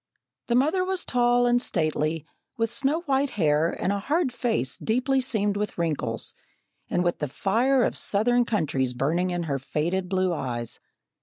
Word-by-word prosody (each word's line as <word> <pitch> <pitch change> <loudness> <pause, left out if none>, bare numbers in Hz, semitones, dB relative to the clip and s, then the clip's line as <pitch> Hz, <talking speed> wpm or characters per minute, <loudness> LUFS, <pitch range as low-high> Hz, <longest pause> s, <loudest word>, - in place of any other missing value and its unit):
The 235 - +1
mother 310 +9 +3
was 375 -1 -2
tall 245 0 +3
and 245 0 +3
stately, 155 - 0 0.3
with 230 0 -1
snow 275 +7 0
white 280 -3 +1
hair 155 -2 +3
and 195 - 0
a 200 - -1
hard 290 - 0
face 225 - -1
deeply 255 +4 +1
seamed 210 -5 0
with 210 0 -3
wrinkles, 145 -9 -1 0.6
and 175 - +1
with 175 -1 0
the 150 - -1
fire 240 - +2
of - - 0
southern 240 +4 +2
countries 140 - 0
burning 170 +8 0
in 175 -1 -2
her 140 -4 -2
faded 175 +7 -2
blue 185 -1 +1
eyes. 120 -6 -4
200 Hz, 165 wpm, -26 LUFS, 160-245 Hz, 0.6 s, mother